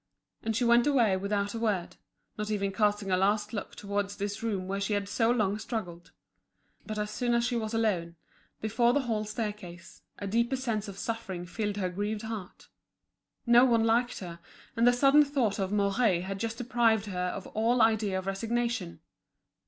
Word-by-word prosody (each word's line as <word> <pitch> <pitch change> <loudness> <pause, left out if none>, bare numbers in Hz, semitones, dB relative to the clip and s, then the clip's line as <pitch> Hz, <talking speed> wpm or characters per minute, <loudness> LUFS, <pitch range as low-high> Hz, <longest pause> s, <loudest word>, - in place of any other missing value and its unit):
And 225 0 -2
she 245 - +1
went 235 +2 +5
away 235 -9 +3
without 200 +1 -1
a 230 - -4
word, 205 -6 -1 0.4
not 210 -2 -4
even 200 -2 -1
casting 205 -1 +1
a 185 - +3
last 205 +3 +1
look 205 - -5
towards 200 0 -3
this 205 +1 -4
room 200 -5 -2
where 195 +1 -2
she 200 +2 -1
had 200 -1 -1
so 225 +2 +1
long 210 -4 +1
struggled. 180 -7 -5 0.8
But 215 -1 -4
as 210 0 -2
soon 240 +1 0
as 235 0 +2
she 245 0 -1
was 220 -2 -2
alone, 195 -7 0 0.5
before 230 +3 +2
the 285 - +2
hall 220 -4 -2
staircase, 205 -6 -6 0.2
a 200 - -6
deeper 235 +6 +1
sense 230 -5 -2
of 195 -1 -8
suffering 200 -6 -4
filled 205 +2 -3
her 185 -3 -1
grieved 210 +3 -3
heart. 220 -5 -7 0.8
No 240 +1 +7
one 235 -3 +4
liked 235 +1 +1
her, 170 -2 -7 0.4
and 235 +1 +3
the - - +8
sudden 275 +4 +5
thought 260 -8 0
of 190 0 -1
Mouret 200 -2 +2
had 195 +1 -5
just 230 +1 -3
deprived 230 -3 +2
her 180 -3 -2
of 190 +1 -5
all 230 +3 +2
idea 220 -4 +3
of 190 - -4
resignation. 225 -1 -2
215 Hz, 185 wpm, -29 LUFS, 195-230 Hz, 0.8 s, the